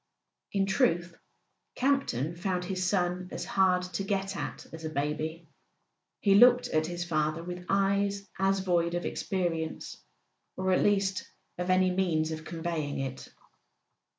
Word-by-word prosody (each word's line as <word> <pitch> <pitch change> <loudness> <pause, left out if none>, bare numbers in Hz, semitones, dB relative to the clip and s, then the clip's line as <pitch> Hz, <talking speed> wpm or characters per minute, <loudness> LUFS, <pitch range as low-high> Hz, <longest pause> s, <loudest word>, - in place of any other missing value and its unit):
In 195 -1 +2
truth, 175 -5 +1 0.6
Campton 245 - +1
found 180 0 -2
his 185 0 -2
son 180 -1 0
as - - -4
hard 185 -2 +3
to 180 +1 -3
get 195 -1 -1
at - - -5
as 165 0 -8
a 160 - -2
baby; 155 +3 -3 0.7
he 200 - +4
looked 245 +4 +7
at 155 0 +1
his 175 0 -3
father 155 0 0
with 180 +1 -7
eyes 200 0 +1
as 195 0 +2
void 175 -2 +1
of 175 - -2
experience, 170 -4 -3 0.5
or 185 0 0
at 185 - +3
least 195 -2 +1 0.3
of 180 +1 -2
any 185 0 +4
means 165 -4 +1
of 160 0 -5
conveying 165 -3 -3
it. 135 -1 -5
180 Hz, 145 wpm, -29 LUFS, 165-195 Hz, 0.7 s, looked